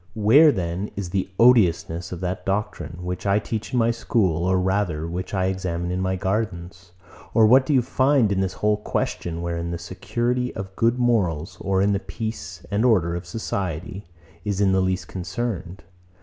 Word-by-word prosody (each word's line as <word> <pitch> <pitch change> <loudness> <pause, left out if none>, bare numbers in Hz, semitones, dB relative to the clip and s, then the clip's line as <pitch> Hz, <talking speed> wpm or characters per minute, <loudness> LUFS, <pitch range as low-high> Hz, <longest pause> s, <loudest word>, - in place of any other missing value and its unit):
108. 110 - -5 0.2
Where, 155 - +7
then, 90 -1 -3
is 95 -3 -5
the 95 0 -1
odiousness 90 -8 +3
of 90 -1 -6
that 95 +2 -3
doctrine, 95 -5 -3
which 90 +2 -4
I 100 +1 +4
teach 110 -1 -4
in 125 - 0
my 115 0 +3
school, 95 -8 0
or 95 0 +2
rather, 90 -4 0
which 90 +3 -5
I 95 -1 +1
examine 90 -2 -2
in 90 +1 -1
my 95 0 0
gardens? 90 -3 -3 0.4
Or 115 -2 +6
what 130 +4 +5
do 150 - +2
you 125 - +4
find 130 -3 +2
in 95 - +1
this 95 -1 0
whole 105 0 +1
question, 85 -4 -3
wherein 85 0 -3
the 85 - -3
security 120 +8 -2
of 95 -1 -6
good 115 +2 +2
morals, 90 -8 0
or 95 0 +1
the 100 -1 +2
peace 110 +3 -6
and 100 +2 +1
order 95 -9 +3
of 85 - -6
society, 100 -3 -4 0.4
is 100 -2 -2
in 100 -2 +3
the 95 0 +3
least 95 -1 -1
concerned? 95 -1 -4
95 Hz, 185 wpm, -23 LUFS, 90-110 Hz, 0.4 s, Where